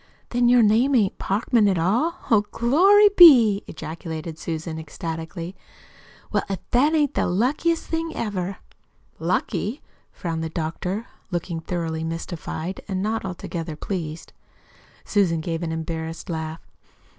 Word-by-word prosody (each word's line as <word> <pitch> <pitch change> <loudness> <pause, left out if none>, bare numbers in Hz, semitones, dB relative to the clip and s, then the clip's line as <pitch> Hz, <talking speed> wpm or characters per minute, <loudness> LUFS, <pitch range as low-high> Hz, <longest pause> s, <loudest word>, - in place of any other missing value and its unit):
"Then 240 0 +2
your 245 -1 +6
name 235 +6 +4
ain't 205 -6 +2
Parkman, 215 +2 +2
at 190 -2 +2
all! 230 - +1 0.2
Oh, 215 -2 +6
glory 385 - +5
be!" 235 - +8
ejaculated 160 0 -6
Susan 160 0 -4
ecstatically. 165 +2 -6 0.8
"Well, - - +2
if 195 - -1
that 290 +6 +4
ain't 295 -3 +2
the - - +1
luckiest 275 - +1
thing 325 0 -2
ever!" 195 -3 -3 0.6
"Lucky?" 185 - -1 0.3
frowned 165 -3 -4
the 160 - -3
doctor, 175 +7 -3 0.2
looking 175 -2 -3
thoroughly 160 -1 -3
mystified, 165 +1 -5
and 190 -2 -2
not 220 +1 -1
altogether 170 -3 -5
pleased. 165 -2 -5 0.7
Susan 185 -6 +2
gave 165 +1 -3
an 165 -2 -2
embarrassed 160 +2 -5
laugh. 160 0 -4
185 Hz, 130 wpm, -23 LUFS, 165-230 Hz, 0.8 s, be